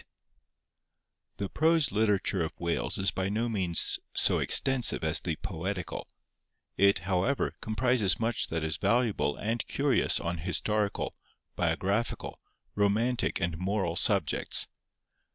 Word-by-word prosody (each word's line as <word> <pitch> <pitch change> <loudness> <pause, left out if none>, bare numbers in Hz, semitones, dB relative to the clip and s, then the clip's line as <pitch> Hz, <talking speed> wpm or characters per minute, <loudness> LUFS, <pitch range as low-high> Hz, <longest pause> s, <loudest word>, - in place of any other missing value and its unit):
The 100 - -2
prose 160 +5 +2
literature 100 -3 +1
of 80 - -6
Wales 85 -1 -1
is 95 0 +1
by 95 0 -2
no 110 +4 -1
means 95 -7 0 0.2
so - - +2
extensive 130 -9 +3
as 80 0 0
the 85 -3 -3
poetical; 90 0 -5 0.7
it, 100 0 +4
however, 95 +9 0
comprises 110 -4 +2
much 115 0 0
that 80 -1 -3
is 80 -2 -2
valuable 105 - +1
and 115 +2 -2
curious - - +2
on 85 0 -3
historical, 100 +5 -1 0.4
biographical, 100 +5 -1 0.3
romantic 110 +5 +1
and 85 -3 -2
moral 95 -2 -1
subjects. 95 -4 +1
100 Hz, 115 wpm, -29 LUFS, 85-115 Hz, 0.7 s, it